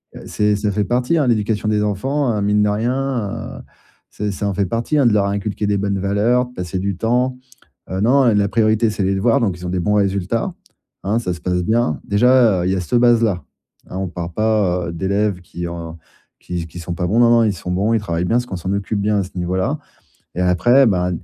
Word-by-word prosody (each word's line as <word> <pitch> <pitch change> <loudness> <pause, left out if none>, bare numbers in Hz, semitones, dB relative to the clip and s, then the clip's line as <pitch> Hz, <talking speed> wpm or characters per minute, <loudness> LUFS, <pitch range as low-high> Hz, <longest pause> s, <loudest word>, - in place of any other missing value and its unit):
heu, - - -9
c'est 105 0 +1
ça 105 0 -1
fait 105 +1 0
partie 125 - +1
hein, 145 - +2
l'éducation 110 -2 0
des 105 -1 +1
enfants 125 +6 0
heu - - -1
mine 105 +1 +2
de 105 - +2
rien 120 0 -2
heu, - - -9 0.5
c'est 105 0 -3
ça 100 +2 -3
en 100 - -1
fait 100 +1 0
partie 115 - -1
hein, 130 - +4
de - - +4
leur 100 -1 +3
inculquer 100 +1 -2
des 100 - +1
bonnes 100 0 -1
valeurs, 115 +6 +1
passer 90 -3 -4
du 100 0 -2
temps, 125 +4 0 0.5
heu, 95 +1 -2
non, 130 +5 +4
la 105 -4 +3
priorité 110 0 +2
c'est 105 - -4
les 95 +1 +1
devoirs 115 +7 +2
donc 95 -6 0
ils 90 - -9
ont - - -3
des 95 - -1
bons 105 +4 +1
résultats, 100 - 0 0.5
hein, 105 +4 0
ça 90 -6 -2
se 85 - -10
passe 90 -1 -1
bien. 110 -6 +1
Déjà, 115 -3 +4
heu, 90 - 0
il - - +1
y - - 0
a - - -1
cette 120 +7 +1
base 120 -1 +4
là, 95 -6 0 0.5
hein, 95 - -6
on 95 -1 -2
parle 85 -1 -6
pas, 105 -5 +1
heu, 85 - -6
d'élèves 100 +1 -1
qui 85 0 -6
ont 85 -1 -7 0.4
qui 85 -2 -5
qui 80 - -12
sont 85 +1 -5
pas 90 +1 -2
bons. 110 +6 +2
Non, 120 - +6
non, 115 -1 +5
ils 105 - +1
sont 90 0 -6
bons, 100 +5 +1
ils - - +2
travaillent 85 -3 -2
bien 115 - 0
parce 125 - -1
qu'on 95 - -5
s'en 95 +3 -4
occupe 100 +1 -2
bien 105 0 +1
à - - 0
ce 95 - -10
niveau 90 +1 -2
là 135 +11 -1 0.6
et 90 - -3
après, 120 +10 +4
bah, 90 -3 +1
105 Hz, 250 wpm, -19 LUFS, 90-115 Hz, 0.6 s, Non